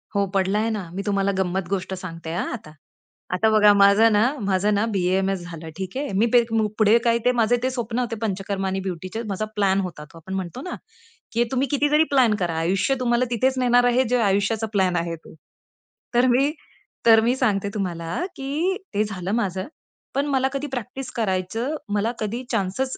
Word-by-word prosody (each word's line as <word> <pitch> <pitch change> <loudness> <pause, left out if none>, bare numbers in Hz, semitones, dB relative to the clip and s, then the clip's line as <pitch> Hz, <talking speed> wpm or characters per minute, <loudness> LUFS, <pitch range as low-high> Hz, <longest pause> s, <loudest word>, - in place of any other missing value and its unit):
हो 200 0 +2
पडलाय 200 +4 +1
ना. 205 -6 -4
मी 195 - -2
तुम्हाला 200 -1 +1
गंमत 190 -1 -1
गोष्ट 190 -1 -2
सांगते 165 -3 -7
हा 175 - -1
आता. 200 -10 -8 0.6
आता 215 +5 +3
बघा 210 -1 +6
माझं 200 +3 +6
ना, 210 0 +4 0.2
माझं 200 +1 +1
ना 205 +2 +2
बी-ए-एम-एस 190 0 0
झालं. 165 -1 -8
ठीक 190 +1 -5
आहे. 285 -3 -3
मी - - +5 0.5
पुढे 215 +1 +5
काय 235 0 +4
ते 250 - +5
माझे 230 +2 +3
ते 255 - +2
स्वप्न 240 -1 -3
होते 240 -2 -2
पंचकर्मा 195 -1 -2
आणि 190 0 -1
ब्युटीचे. 185 +5 -5
माझा 200 +2 -2
प्लॅन 195 -1 +2
होता 175 -5 -6
तो. - - -13
आपण 165 +4 -8
म्हणतो 190 +6 -5
ना, 360 - -5 0.6
की 235 +1 +3
तुम्ही 265 +1 +1
कितीतरी 295 +2 +3
प्लॅन 255 -6 +4
करा. 175 -3 -1
आयुष्य 190 +10 +1
तुम्हाला 245 0 +2
तिथेच 260 +3 +1
नेणार 245 -1 +4
आहे 255 +2 +3
जे 250 - +3
आयुष्याचा 205 +2 +1
प्लॅन 190 -3 +2
आहे. 170 -1 -1
तो 165 - -15 0.8
तर 245 +1 +5
मी 270 +4 +3 0.5
तर 225 -1 +8
मी 240 +3 +2
सांगते 205 -6 0
तुम्हाला, 175 - -3
की 300 +8 -1 0.2
ते 205 +1 +2
झालं 195 -3 -4
माझं. 190 -3 -2 0.5
पण 280 +1 +1
मला 265 -2 +2
कधी 280 +1 -3
प्रॅक्टिस 255 0 -6
करायचं, 225 +6 -1 0.2
मला 210 +3 +1
कधी 225 +4 -3
चान्सच 225 +5 -1
210 Hz, 185 wpm, -23 LUFS, 190-245 Hz, 0.8 s, तर